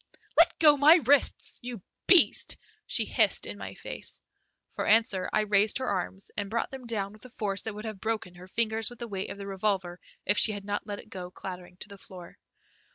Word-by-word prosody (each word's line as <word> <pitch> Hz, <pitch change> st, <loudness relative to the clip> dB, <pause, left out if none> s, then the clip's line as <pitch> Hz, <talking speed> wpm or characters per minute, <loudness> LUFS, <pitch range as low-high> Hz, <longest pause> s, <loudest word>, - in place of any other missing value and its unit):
"Let -, -, +5 dB
go 300 Hz, -2 st, +6 dB
my 295 Hz, +4 st, +8 dB
wrists, 285 Hz, -3 st, +2 dB
you 245 Hz, -2 st, -6 dB, 0.3 s
beast," 365 Hz, -4 st, +4 dB, 0.3 s
she -, -, +2 dB
hissed -, -, +2 dB
in -, -, -7 dB
my -, -, -7 dB
face. -, -, -4 dB, 0.5 s
For -, -, -3 dB
answer 210 Hz, -4 st, +3 dB
I 215 Hz, -, +3 dB
raised 205 Hz, 0 st, +3 dB
her 260 Hz, -, -3 dB
arms 195 Hz, -2 st, -3 dB
and 205 Hz, -1 st, -3 dB
brought 230 Hz, +2 st, -1 dB
them 260 Hz, -2 st, -8 dB
down 205 Hz, -3 st, -2 dB
with 215 Hz, -, -16 dB
a -, -, -10 dB
force 200 Hz, -4 st, -1 dB
that 220 Hz, -2 st, -5 dB
would 210 Hz, +2 st, -7 dB
have 215 Hz, -4 st, -6 dB
broken 220 Hz, -5 st, -2 dB
her 180 Hz, +1 st, -13 dB
fingers 220 Hz, +1 st, +1 dB
with 245 Hz, -, -12 dB
the 235 Hz, -, -6 dB
weight 195 Hz, -3 st, -4 dB
of -, -, -7 dB
the 200 Hz, -, -7 dB
revolver 190 Hz, -2 st, -1 dB, 0.3 s
if 205 Hz, -, +3 dB
she 215 Hz, -, +3 dB
had 200 Hz, -1 st, -7 dB
not 205 Hz, +1 st, -3 dB
let 205 Hz, -1 st, -4 dB
it -, -, -13 dB
go 180 Hz, -2 st, -6 dB
clattering 180 Hz, -1 st, -8 dB
to -, -, -6 dB
the 200 Hz, -1 st, -12 dB
floor. 180 Hz, -2 st, -12 dB
205 Hz, 220 wpm, -28 LUFS, 195-230 Hz, 0.5 s, my